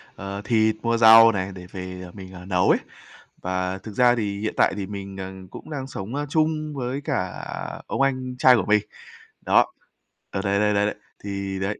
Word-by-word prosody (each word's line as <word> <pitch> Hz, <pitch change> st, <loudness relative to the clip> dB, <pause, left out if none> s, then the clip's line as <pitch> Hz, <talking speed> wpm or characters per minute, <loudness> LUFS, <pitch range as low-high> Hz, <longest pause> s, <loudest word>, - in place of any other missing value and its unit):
ờ, 100 Hz, +1 st, -6 dB
thịt, 110 Hz, -2 st, +3 dB
mua 115 Hz, 0 st, +1 dB
rau 115 Hz, 0 st, +9 dB
này 95 Hz, -1 st, -3 dB
để 90 Hz, -1 st, -9 dB
về, 90 Hz, -1 st, -7 dB
à, -, -, -12 dB
mình 95 Hz, -2 st, -10 dB
nấu 90 Hz, -1 st, +2 dB
ấy. -, -, +4 dB, 0.6 s
Và 95 Hz, 0 st, -2 dB
thực 110 Hz, -, -9 dB
ra 120 Hz, +3 st, +4 dB
thì 100 Hz, -3 st, -2 dB
hiện 110 Hz, -, -2 dB
tại -, -, +4 dB
thì 100 Hz, -, -3 dB
mình, 100 Hz, -1 st, -7 dB
à, 95 Hz, 0 st, -5 dB, 0.2 s
cũng -, -, -10 dB
đang 135 Hz, -3 st, -5 dB
sống, 110 Hz, +1 st, -6 dB
a, 145 Hz, -, -2 dB
chung 155 Hz, 0 st, 0 dB
với 130 Hz, +1 st, -3 dB
cả 90 Hz, -8 st, -3 dB, 0.4 s
ông -, -, -2 dB
anh 130 Hz, -2 st, 0 dB
trai 130 Hz, -1 st, +7 dB
của 115 Hz, -, 0 dB
mình. 105 Hz, 0 st, +4 dB, 0.6 s
Đó. -, -, +4 dB, 0.7 s
Ừ, 95 Hz, -, -2 dB
đấy, 100 Hz, -1 st, +1 dB
đấy, 105 Hz, 0 st, +2 dB
đấy, 100 Hz, 0 st, +2 dB
đấy, 105 Hz, -, -1 dB, 0.3 s
thì 100 Hz, -1 st, -4 dB
đấy, 95 Hz, +2 st, -2 dB
105 Hz, 205 wpm, -24 LUFS, 95-125 Hz, 0.7 s, rau